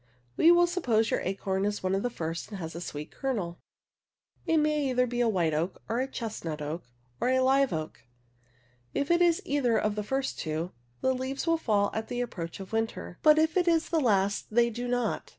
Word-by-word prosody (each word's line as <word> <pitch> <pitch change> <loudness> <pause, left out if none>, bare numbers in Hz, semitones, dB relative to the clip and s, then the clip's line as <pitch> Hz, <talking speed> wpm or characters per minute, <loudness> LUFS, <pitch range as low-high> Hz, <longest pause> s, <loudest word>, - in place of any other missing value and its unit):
We 335 - +6
will 345 0 +6
suppose 245 - +1
your - - +2
acorn 190 0 -1
is 205 -1 -1
one 185 0 +1
of 195 - +1
the 245 - 0
first 165 -6 -4
and 205 - -6
has 165 -3 -6
a 170 - -6
sweet 150 -3 -6
kernel. 205 -11 -3 0.9
It 325 - +3
may 300 -3 +2
be 250 - +4
either 245 0 0
a 235 - +3
white 170 -6 +1
oak, 165 +5 -1
a 240 +4 0
chestnut 210 - -5
oak, 150 +2 -4 0.3
or - - +1
a 260 0 +3
live 270 +1 +3
oak. 155 -1 -5 0.9
If 285 +3 0
it 345 +1 +4
is 340 -1 +3
either 260 -5 +2
of 210 - +1
the 210 - -2
first 265 +6 -2
two, 160 +3 -3 0.3
the 260 - +2
leaves 260 +3 -3
will 330 -1 +3
fall 205 -7 +1
at 220 0 -3
the 245 - -3
approach 175 -9 -5
of 195 +2 -9
winter, 225 -5 -3
but 305 0 +6
if 315 0 +2
it 360 -1 +2
is 330 -1 +2
the 330 - +2
last 200 -6 +1
they 235 +2 +3
do 240 +2 -4
not. 245 -2 -1
230 Hz, 215 wpm, -29 LUFS, 190-270 Hz, 0.9 s, We